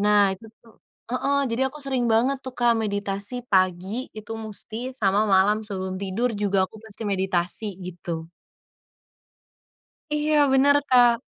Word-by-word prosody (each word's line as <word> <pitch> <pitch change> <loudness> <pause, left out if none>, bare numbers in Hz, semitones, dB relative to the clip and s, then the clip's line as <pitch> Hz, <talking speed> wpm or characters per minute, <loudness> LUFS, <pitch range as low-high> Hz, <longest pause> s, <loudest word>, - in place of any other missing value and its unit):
Nah 205 -1 +4
itu 210 +4 -10 0.2
tuh 225 - -21 0.3
heeh, 275 +3 0
jadi 260 +3 0
aku 300 - -11
sering 260 -3 0
banget 235 +5 +3
tuh, 260 - -6
Kak, 240 -1 +4
meditasi 205 +2 -1
pagi 190 +5 +1
itu 215 0 -8
musti 225 +3 -6
sama 205 -2 +2
malam 205 +3 +3
sebelum 190 -2 -4
tidur 200 +6 -1
juga 200 -2 +2
aku - - -15
pasti 220 +1 -8
meditasi, 190 +1 0
gitu. 170 -2 -6 1.9
Iya 300 +1 +1 0.2
bener, 280 +2 +5
Kak. 245 -2 +6
215 Hz, 140 wpm, -24 LUFS, 195-245 Hz, 1.9 s, Kak